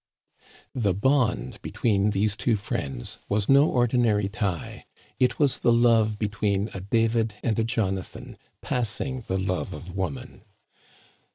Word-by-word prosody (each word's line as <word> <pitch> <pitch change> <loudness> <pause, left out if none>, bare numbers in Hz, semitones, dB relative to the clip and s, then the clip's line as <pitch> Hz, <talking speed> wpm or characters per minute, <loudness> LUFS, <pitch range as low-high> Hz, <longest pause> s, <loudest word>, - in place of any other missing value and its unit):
The 105 -7 0
bond 130 +3 +1
between 105 -3 +1
these 105 +1 +1
two 110 +2 +1
friends 70 - -4
was 105 0 0
no 140 +2 +6
ordi 120 0 +2
nary 105 -4 +2
tie; 100 -6 -4 0.3
it 125 -1 +2
was 145 -3 +2
the 120 - +3
love 115 -2 +3
between 105 -1 -1
a - - -5
David 115 +1 +1
and 115 -2 0
a - - +3
Jona 110 -5 0
than, - - -11
" - - -48
passing 125 0 -2
the 95 - 0
love 95 -1 -2
of 90 +1 -9
woman." 95 -8 -4
110 Hz, 150 wpm, -26 LUFS, 100-120 Hz, 0.3 s, no